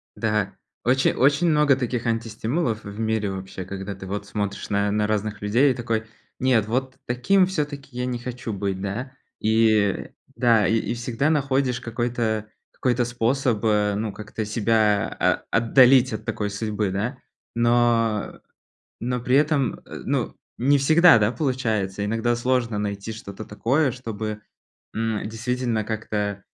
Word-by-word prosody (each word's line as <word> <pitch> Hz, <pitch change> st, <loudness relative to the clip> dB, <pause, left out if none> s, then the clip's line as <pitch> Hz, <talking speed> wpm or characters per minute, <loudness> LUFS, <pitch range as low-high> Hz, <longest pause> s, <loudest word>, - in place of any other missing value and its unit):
Да, 105 Hz, -3 st, -1 dB, 0.3 s
очень 130 Hz, +2 st, +3 dB
очень 140 Hz, +6 st, +3 dB
много 150 Hz, -3 st, +4 dB
таких 125 Hz, -2 st, -2 dB
антистимулов 115 Hz, +2 st, -1 dB
в 100 Hz, +1 st, -8 dB
мире 110 Hz, -2 st, 0 dB
вообще, 95 Hz, -1 st, -6 dB
когда 100 Hz, +1 st, -6 dB
ты, 95 Hz, -, -9 dB
вот, 100 Hz, +1 st, -4 dB
смотришь 100 Hz, -1 st, -4 dB
на 100 Hz, 0 st, +1 dB
на 105 Hz, 0 st, +1 dB
разных 105 Hz, -1 st, -2 dB
людей 120 Hz, +7 st, +3 dB
и -, -, -2 dB
такой: 115 Hz, -2 st, -1 dB, 0.4 s
нет, 125 Hz, -5 st, +2 dB
вот 130 Hz, +3 st, -1 dB
т -, -, -30 dB
таким 180 Hz, +11 st, +3 dB
всё-таки 145 Hz, -7 st, -4 dB
я 125 Hz, 0 st, -2 dB
не 125 Hz, -1 st, -2 dB
хочу 120 Hz, -2 st, -5 dB
быть, 100 Hz, -1 st, -3 dB
да. 110 Hz, +7 st, -4 dB, 0.3 s
И, 110 Hz, +1 st, +3 dB
э, 105 Hz, -3 st, +1 dB, 0.3 s
да, 115 Hz, -5 st, +4 dB
и 110 Hz, +5 st, +2 dB
и 115 Hz, -, -2 dB
всегда 120 Hz, +4 st, -1 dB
находишь 135 Hz, -4 st, +1 dB
какой-то 115 Hz, -2 st, -2 dB, 0.2 s
какой-то 125 Hz, -1 st, 0 dB
способ, 120 Hz, 0 st, 0 dB
э, 105 Hz, -2 st, +2 dB
ну, 105 Hz, +1 st, -2 dB
как-то 105 Hz, +1 st, -5 dB
себя 105 Hz, -1 st, +2 dB
а -, -, +4 dB
а -, -, -8 dB
отдалить 125 Hz, +2 st, +5 dB
от 110 Hz, 0 st, -5 dB
такой 105 Hz, -2 st, -2 dB
судьбы, 105 Hz, -1 st, -2 dB
да. 110 Hz, +8 st, -2 dB, 0.4 s
Но, 120 Hz, -2 st, +3 dB
э, -, -, -19 dB, 0.6 s
но 125 Hz, +1 st, -2 dB
при 125 Hz, +2 st, +1 dB
этом, 145 Hz, -4 st, +2 dB
э, -, -, -9 dB
ну, -, -, -1 dB, 0.2 s
не 140 Hz, +4 st, +3 dB
всегда, 160 Hz, +4 st, +6 dB
да, 105 Hz, 0 st, +2 dB
получается. 110 Hz, -, -1 dB
Иногда 115 Hz, +3 st, 0 dB
сложно 120 Hz, -2 st, 0 dB
найти 100 Hz, +1 st, -3 dB
что-то 100 Hz, -1 st, -8 dB
такое, 130 Hz, +8 st, +1 dB
чтобы, 110 Hz, -3 st, -5 dB, 0.5 s
м, 110 Hz, -1 st, -2 dB
действительно 120 Hz, 0 st, -2 dB
как-то, 105 Hz, -2 st, -3 dB
115 Hz, 160 wpm, -24 LUFS, 105-125 Hz, 0.6 s, всегда